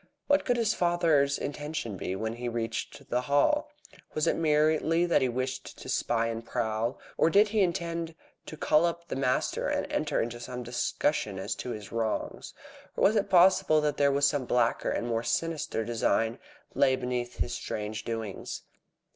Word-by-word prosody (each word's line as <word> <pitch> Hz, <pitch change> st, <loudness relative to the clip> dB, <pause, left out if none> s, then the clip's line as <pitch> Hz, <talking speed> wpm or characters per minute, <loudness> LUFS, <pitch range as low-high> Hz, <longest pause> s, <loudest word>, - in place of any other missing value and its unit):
What 285 Hz, 0 st, +3 dB
could 245 Hz, -1 st, +2 dB
his 225 Hz, -2 st, +2 dB
father's 165 Hz, -6 st, +2 dB
intention 145 Hz, -6 st, -4 dB
be 95 Hz, 0 st, -3 dB
when 110 Hz, +3 st, -3 dB
he 120 Hz, 0 st, -3 dB
reached 115 Hz, -1 st, -4 dB
the 125 Hz, -, +2 dB
Hall? 145 Hz, -, +2 dB, 0.5 s
Was 155 Hz, -, +1 dB
it -, -, +2 dB
merely 155 Hz, +2 st, +2 dB
that 170 Hz, -, +3 dB
he 130 Hz, -, +2 dB
wished 130 Hz, +2 st, -4 dB
to -, -, -10 dB
spy 115 Hz, -1 st, +1 dB
and 115 Hz, 0 st, -3 dB
prowl, 115 Hz, +1 st, -2 dB, 0.2 s
or -, -, +5 dB
did 205 Hz, +4 st, +5 dB
he 215 Hz, 0 st, +2 dB
intend 170 Hz, -2 st, -1 dB, 0.3 s
to 155 Hz, -, -8 dB
call 155 Hz, +2 st, +3 dB
up 170 Hz, 0 st, -3 dB
the -, -, -2 dB
master 130 Hz, -1 st, 0 dB
and -, -, 0 dB
enter -, -, 0 dB
into 120 Hz, +1 st, -2 dB
some 125 Hz, +1 st, -6 dB
discussion 120 Hz, -2 st, -1 dB
as 95 Hz, -, -2 dB
to -, -, -5 dB
his 105 Hz, -4 st, -6 dB
wrongs? 115 Hz, -1 st, -3 dB, 0.4 s
Or -, -, +1 dB
was 215 Hz, -, +5 dB
it 205 Hz, -, +1 dB
possible 185 Hz, -3 st, +5 dB
that 145 Hz, -1 st, +2 dB
some 140 Hz, -2 st, +3 dB
blacker 120 Hz, -1 st, +1 dB
and -, -, -1 dB
more 115 Hz, -1 st, 0 dB
sinister 155 Hz, -4 st, -1 dB
design 115 Hz, 0 st, 0 dB, 0.3 s
lay 130 Hz, -1 st, +4 dB
beneath 125 Hz, -1 st, -3 dB
his 120 Hz, -, -1 dB
strange 110 Hz, -1 st, -4 dB
doings? 115 Hz, -4 st, -5 dB
135 Hz, 170 wpm, -29 LUFS, 115-165 Hz, 0.5 s, or